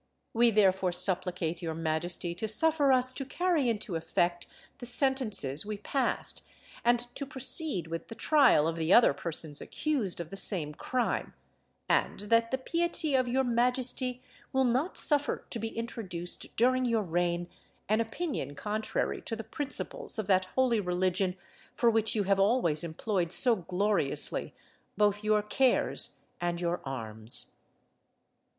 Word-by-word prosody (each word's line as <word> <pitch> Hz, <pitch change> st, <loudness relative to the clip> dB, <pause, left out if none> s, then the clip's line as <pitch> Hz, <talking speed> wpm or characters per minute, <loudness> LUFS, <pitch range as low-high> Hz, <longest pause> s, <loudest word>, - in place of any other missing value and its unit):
We 235 Hz, +1 st, +5 dB
therefore 190 Hz, -4 st, +3 dB
supplicate 180 Hz, -2 st, 0 dB
your 165 Hz, -2 st, -3 dB
majesty 165 Hz, +2 st, -1 dB
to 185 Hz, +6 st, -3 dB
suffer 290 Hz, +5 st, +3 dB
us 255 Hz, 0 st, +4 dB
to 270 Hz, -, -3 dB
carry 320 Hz, -2 st, 0 dB
into 210 Hz, -5 st, -2 dB
effect 175 Hz, +2 st, -1 dB, 0.3 s
the 245 Hz, -, -4 dB
sentences 240 Hz, -, +1 dB
we 210 Hz, 0 st, -5 dB
passed, 255 Hz, +5 st, -2 dB, 0.4 s
and 240 Hz, +1 st, +4 dB, 0.2 s
to -, -, -4 dB
proceed 270 Hz, -, -1 dB
with 165 Hz, 0 st, -6 dB
the 225 Hz, -, -9 dB
trial 265 Hz, -, +4 dB
of 165 Hz, 0 st, -2 dB
the 160 Hz, +1 st, -1 dB
other 235 Hz, -9 st, +7 dB
persons 155 Hz, 0 st, -1 dB
accused 260 Hz, -, 0 dB
of 170 Hz, -2 st, -6 dB
the -, -, -6 dB
same 180 Hz, -6 st, -2 dB
crime; 250 Hz, +10 st, -2 dB, 0.5 s
and -, -, +1 dB
that 230 Hz, 0 st, +4 dB
the 260 Hz, -, 0 dB
piety 335 Hz, +2 st, -1 dB
of 255 Hz, -1 st, +2 dB
your 260 Hz, +2 st, +1 dB
majesty 250 Hz, +1 st, 0 dB, 0.3 s
will 265 Hz, 0 st, +2 dB
not 260 Hz, +9 st, 0 dB
suffer 290 Hz, -2 st, +1 dB
to 235 Hz, -, -3 dB
be 225 Hz, -, -3 dB
introduced 215 Hz, -7 st, -6 dB
during 255 Hz, +2 st, +3 dB
your 230 Hz, -3 st, +1 dB
reign 175 Hz, 0 st, -1 dB, 0.4 s
an 215 Hz, +3 st, +2 dB
opinion 225 Hz, -, -4 dB
contrary 215 Hz, +5 st, -2 dB
to 225 Hz, -, -4 dB
the 225 Hz, -, -6 dB
principles 290 Hz, -, -5 dB
of 215 Hz, -, -2 dB
that 185 Hz, -1 st, +3 dB
holy 255 Hz, -4 st, +3 dB
religion 180 Hz, 0 st, 0 dB, 0.4 s
for 235 Hz, -1 st, +3 dB
which 220 Hz, 0 st, +1 dB
you 210 Hz, -, +1 dB
have 195 Hz, 0 st, +2 dB
always 195 Hz, -7 st, +2 dB
employed 170 Hz, +1 st, -2 dB
so 245 Hz, +2 st, +6 dB
gloriously 185 Hz, -3 st, +1 dB, 0.4 s
both 205 Hz, 0 st, +2 dB
your 215 Hz, 0 st, +2 dB
cares 255 Hz, +4 st, +1 dB, 0.3 s
and 175 Hz, 0 st, -1 dB
your 175 Hz, 0 st, -1 dB
arms." 110 Hz, -4 st, -4 dB
215 Hz, 150 wpm, -30 LUFS, 175-255 Hz, 0.5 s, other